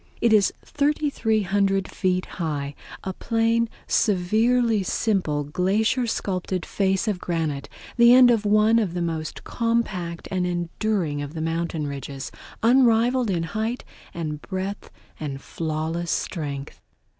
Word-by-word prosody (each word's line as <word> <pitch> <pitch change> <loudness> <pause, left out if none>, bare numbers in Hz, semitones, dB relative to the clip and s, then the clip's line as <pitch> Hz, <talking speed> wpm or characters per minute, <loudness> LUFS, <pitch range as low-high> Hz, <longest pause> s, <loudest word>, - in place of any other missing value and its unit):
It 230 -2 +3
is 205 -3 +5
3300 215 -10 +1
feet 185 -1 0
high, 145 -5 -3 0.3
a 190 - -3
plain, 230 +2 +1 0.2
severely 220 +4 +2
simple, 185 -7 0
glacier 205 - +1
sculptured 185 -4 -2
face 195 +2 0
of 205 -4 0
granite, 160 -6 -2 0.3
the 235 0 +7
end 250 -1 +8
of 225 -3 +2
one 215 +2 +4
of 190 -6 -1
the 175 - -1
most 160 -2 -4
compact 210 -8 -1
and 185 -1 0
enduring 175 -2 -1
of 145 +2 -6
the - - -3
mountain 165 -1 -2
ridges, 140 -1 -6 0.3
unrivaled 240 0 +4
in 170 -3 0
height 220 +8 -3 0.3
and 155 -3 -4
breadth 190 +1 -5 0.3
and 140 -3 -4
flawless 160 +3 -3
strength. 145 -6 -3
190 Hz, 125 wpm, -24 LUFS, 165-225 Hz, 0.3 s, end